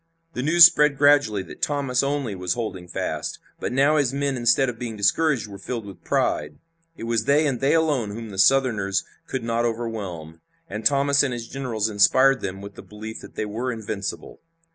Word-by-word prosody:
The - - -3
news 165 +5 +8
spread 150 -4 +4
gradually 140 -9 +3
that - - -13
Thomas 140 -4 0
only 140 -5 -2
was 90 -2 -2
holding 105 -7 -5
fast, - - -4 0.2
but - - -3
now 140 +4 +3
his 140 -4 +1
men 140 0 -1
instead 125 +2 +2
of 120 -2 -5
being 115 -3 -5
discouraged 125 +5 +1
were 100 -1 -10
filled 115 +2 -5
with 100 -3 -12
pride. 75 0 -1 0.4
It - - -8
was 115 -1 -1
they 150 +2 +3
and 135 -5 -1
they 135 +4 +3
alone 150 -9 +1
whom 110 +1 -7
the 95 - -7
Southerners 110 -6 +2 0.2
could 130 -3 -4
not 115 0 -1
overwhelm, 100 -9 -5 0.3
and 105 +2 -6
Thomas 140 +3 +3
and 135 -3 0
his 120 -1 -6
generals 120 -6 -3
inspired 130 +6 +4
them 95 0 -5
with 100 0 -9
the - - -11
belief 110 +1 -9
that - - -13
they 110 - -2
were 115 +5 -3
invincible. 110 -3 -6
120 Hz, 195 wpm, -23 LUFS, 105-135 Hz, 0.4 s, news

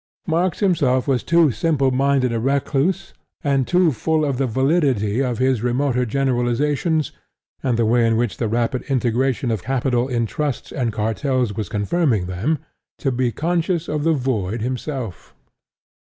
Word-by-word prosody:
Marx 175 +2 0
himself 145 -10 +2
was 130 -3 +2
too 170 -3 +3
simpleminded 135 -4 +1
a 115 - 0
recluse 140 +8 0 0.3
and 135 -3 +1
too 180 -2 +3
full 155 +5 0
of 135 -3 -1
the 135 - +1
validity 130 - +1
of 125 -3 -1
his 130 -3 +1
remoter 125 +1 0
generalizations, 135 +5 0 0.5
and 125 -3 0
the 115 - +2
way 115 +1 +3
in 115 -1 +2
which 120 -2 -1
the 115 - -1
rapid 120 +3 0
integration 130 -1 0
of 110 -4 -1
capital 125 0 0
in 120 -3 0
Trusts 145 +3 -3
and 125 -6 -1
Kartels 115 +2 -1
was 105 -3 -4
confirming 110 - +1
them, 95 - -1 0.4
to 135 - -1
be 125 -1 0
conscious 170 - -1
of 150 -1 -2
the 165 +1 +3
void 115 -6 -1
himself. 125 - -5
130 Hz, 150 wpm, -21 LUFS, 120-150 Hz, 0.5 s, too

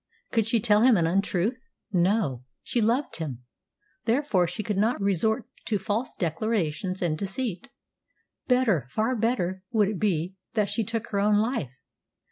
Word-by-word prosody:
Could 225 -2 +2
she 230 0 +3
tell 210 -1 +4
him 245 -2 +6
an 170 - +2
untruth? 195 - 0 0.2
No. 180 - +1 0.2
She 240 - 0
loved 235 +6 +1
him, 135 -7 -5 0.6
therefore 230 -7 +2
she 180 +6 -4
could 210 - -2
not 225 +4 +2
resort 210 +4 +1 0.2
to 215 - +1
false 205 +6 -2
declarations 185 0 -1
and 165 -3 +1
deceit. 205 +6 -4 0.8
Better 230 - +2
far 220 - 0
better 200 -5 0
would 210 -4 +2
it 205 -4 -3
be 180 -3 0 0.2
that 210 -3 +2
she 230 - 0
took 230 +2 -4
her 200 - +1
own 210 +1 +3
life. 210 - 0
210 Hz, 155 wpm, -26 LUFS, 180-230 Hz, 0.8 s, him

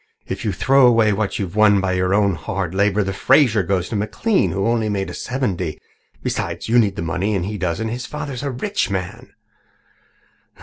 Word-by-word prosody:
If - - -5
you 110 - 0
throw 135 +8 +4
away 115 -3 +4
what 105 0 -2
you've 95 -2 -4
won 105 -2 +5
by 95 -1 -1
your 90 0 0
own 100 -1 +3
hard 85 +2 -4
labour, 100 +1 +2
the 95 0 -3
Fraser 125 0 +4
goes 95 0 -1
to - - -3
McLean, 110 - 0
who 95 +1 -2 0.3
made 100 -2 -1
only 95 - -5
seventy. 95 - -3 0.4
Besides, - - -3
you 120 +2 +4
need 100 -4 +2
the - - -4
money 95 +5 -1
and 90 -2 -1
he 105 +1 -5
doesn't. 95 +5 -2
His 120 +2 -5
father 150 -2 -5
is 125 - -5
a 140 - -2
rich 135 - -2
man." 95 -2 -5
105 Hz, 200 wpm, -20 LUFS, 95-120 Hz, 0.4 s, won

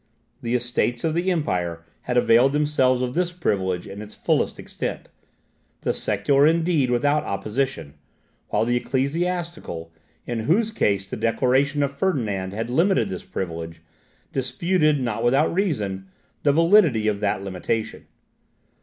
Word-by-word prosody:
The 120 +1 -1
Estates 120 0 0
of 160 - +1
the 175 +3 0
Empire 90 - -1 0.2
had 125 - +1
availed 125 +3 +5
themselves 135 -4 +2
of 125 0 -2
this 175 +2 0
privilege 95 - -1
in 100 +2 -8
its 105 0 -10
fullest - - 0
extent; - - -5 0.7
the - - 0
secular 135 +8 +2
indeed 165 -4 +2
without 145 +5 +2
opposition; 100 - -3 0.5
while - - +1
the 120 +1 +1
ecclesiastical, 140 - -2 0.3
in 120 -2 -3
whose 220 +6 +3
case 100 - 0
the - - -5
declaration 135 +5 +1
of 140 0 -2
Ferdinand 110 - -1
had 115 +4 -4
limited 165 - +2
this 95 - -5
privilege, 80 -2 -6 0.5
disputed, 155 +3 +2
not 115 -3 -2
without 135 +7 +3
reason, 105 - -1 0.3
the 145 - +3
validity 165 - +4
of 105 -2 0
that 100 -1 -1
limitation. 100 +4 -3
125 Hz, 135 wpm, -23 LUFS, 100-155 Hz, 0.7 s, availed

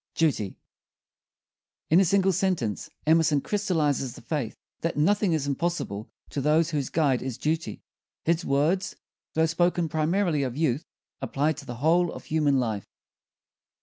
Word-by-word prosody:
DUTY 140 - 0 1.3
In 165 - +7
a 195 - +5
single 190 +2 +3
sentence 170 - -1 0.2
Emerson 160 -2 +4
crystallizes 150 - 0
the - - -11
faith 145 -8 -3 0.2
that 165 -3 -2
nothing 200 +4 +3
is 155 -3 0
impossible 140 -8 -2 0.2
to 140 - -2
those 155 +3 +3
whose 145 -4 -1
guide 140 -6 +2
is 130 -2 -4
duty. 160 +2 -2 0.4
His 170 +1 +2
words, 160 +8 +1 0.4
though 160 0 +4
spoken 175 +1 +1
primarily 160 +1 +1
of 130 -1 -3
youth, 150 -3 0 0.3
apply 150 +3 0
to 150 -3 -11
the 120 - -5
whole 165 +6 +2
of - - -9
human 150 -3 +2
life. 110 -5 -2
155 Hz, 145 wpm, -26 LUFS, 140-170 Hz, 1.3 s, In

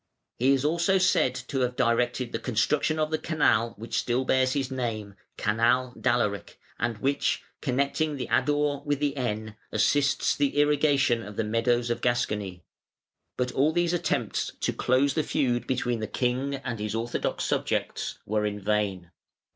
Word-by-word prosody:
He 130 +3 +4
is 135 +1 0
also 170 +5 +2
said 155 -8 +3
to 130 +2 -4
have 125 -1 0
directed 120 +1 +1
the - - -2
construction 140 +6 +1
of 155 0 0
the 155 - 0
canal, 115 -8 +1
which 115 +3 -2
still 125 +2 0
bears 130 0 +2
his 135 -2 -2
name 110 -6 -3 0.2
(Canal 115 +4 +2
d'Alaric), 120 -6 -1 0.2
and 115 -2 -1
which, 135 +5 0 0.2
connecting 140 +3 0
the 130 - -3
Adour 145 -1 +1
with 145 -1 -1
the 145 -1 0
Aisne, 110 -4 -3 0.2
assists 140 +6 +2
the 145 0 0
irrigation 145 -4 +3
of 105 -2 -9
the 115 - 0
meadows 120 +2 +1
of 120 - -2
Gascony. 105 -7 -1 0.7
But 125 0 -1
all 145 +4 +2
these 175 +1 +1
attempts 175 - -1
to - - 0
close 130 +2 +2
the 155 - +1
feud 125 -5 0
between 125 -2 -1
the 110 - -3
king 130 +5 -1
and 125 -4 -5
his 105 +1 -3
orthodox 115 +1 -2
subjects - - -1
were 105 0 0
vain. 100 -4 -1
125 Hz, 160 wpm, -27 LUFS, 115-140 Hz, 0.7 s, He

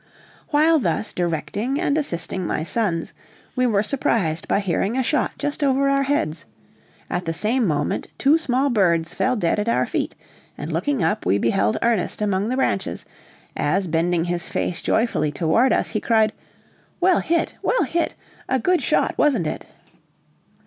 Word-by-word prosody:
While 315 +2 +4
thus 225 - -1
directing 180 - -2
and 290 -4 +1
assisting 185 - -2
my 155 - -1
sons, 170 -2 -1 0.4
we 255 -1 +2
were 205 -3 +2
surprised 195 - 0
by - - +2
hearing 200 +4 -1
a 260 - +2
shot 300 +5 0
just 290 0 -3
over 275 0 +2
our 275 0 +2
heads; 170 - -1 0.6
at 180 - -3
the 165 0 -2
same 230 +5 +1
moment 145 -2 -1
two 295 +4 +4
small 270 -2 +1
birds 170 -7 +2
fell 255 - +1
dead 205 -2 0
at 210 +2 -1
our - - +2
feet, - - -3 0.4
and - - -5
looking 285 - 0
up, 160 - 0
we 95 +3 +2
beheld 105 -1 +1
Ernest 230 -6 +1
among 205 0 0
the 255 - 0
branches, 265 - -1 0.5
as 195 0 0
bending 165 +1 +1
his 175 +1 -3
face 175 - -2
joyfully 220 -10 +1
toward 175 - +2
us, - - +1
he 215 - -2
cried, 220 -2 +2 0.7
"Well 365 0 +4
hit! 335 0 0
well - - +2
hit! 340 0 -1 0.3
a 260 - +2
good 360 +8 +1
shot, - - +1
wasn't 260 - +3
it?" 155 - -4
215 Hz, 165 wpm, -22 LUFS, 170-270 Hz, 0.7 s, While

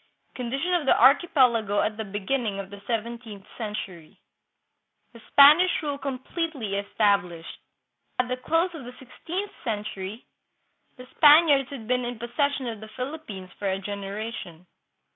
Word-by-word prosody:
Condition 270 +8 -2
of 335 -6 0
the - - +4
Archipelago 250 - +4
at 215 - -1
the 220 - -4
Beginning 205 +2 -2
of 195 0 -7
the 200 0 -10
Seventeenth 230 -3 -4
Century. 195 -7 -7 0.9
The 230 - -14
Spanish 305 +6 +8
Rule 285 -2 -3
Completely 275 - -4
Established. 200 -4 0 0.6
At 250 - +1
the 255 - -1
close 330 +7 0
of 315 -5 -8
the 250 +1 -10
sixteenth 350 +10 -6
century 210 -2 -5 0.7
the 250 - -11
Spaniards 295 -3 +6
had 265 -6 -8
been 250 0 +1
in 240 0 -4
possession 260 +4 -1
of 230 -3 -5
the 220 - -10
Philippines 250 -9 -7
for 200 - -1
a 190 - 0
generation. 200 -3 -6
235 Hz, 140 wpm, -26 LUFS, 205-280 Hz, 0.9 s, Spanish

